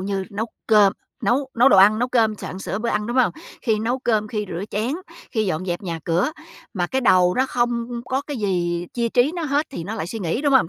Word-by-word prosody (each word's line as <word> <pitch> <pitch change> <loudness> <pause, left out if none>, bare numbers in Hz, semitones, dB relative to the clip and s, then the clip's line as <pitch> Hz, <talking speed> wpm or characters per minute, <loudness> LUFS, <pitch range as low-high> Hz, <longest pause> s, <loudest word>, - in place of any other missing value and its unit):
như 195 0 -2
nấu 215 +3 -3 0.2
cơm, 210 -3 +5 0.3
nấu 265 +2 +1
nấu 250 - +7
đồ 235 - +5
ăn, 205 +3 +7
nấu 245 +1 0
cơm, 225 -4 +2
soạn 190 -2 -7
sửa 195 - -3
bữa 235 +1 -2
ăn, 210 0 0
đúng 240 - -3
hông? 255 -2 +4 0.3
Khi 220 -3 +1
nấu 240 +4 -1
cơm, 215 -4 0
khi 210 -1 -2
rửa 175 +3 -4
chén, 220 +6 -1 0.4
khi 220 -3 0
dọn 185 0 -2
dẹp 175 +1 -2
nhà 170 -4 -4
cửa, 175 - +1 0.4
mà 175 -2 0
cái 265 +8 -1
đầu 180 -6 +4
nó 260 +1 +2
không 240 -1 -1
có 265 +2 -1
cái 290 - -4
gì 175 -5 -1
chia 235 -1 0
trí 250 +6 +2
nó 345 - -3
hết, 290 +1 +1
thì 170 -11 -6
nó 210 +5 -4
lại 170 -7 -4
suy 225 - -5
nghĩ, 185 +5 -1
đúng 285 - +2
hông? 265 -11 +5
220 Hz, 255 wpm, -22 LUFS, 190-245 Hz, 0.4 s, nấu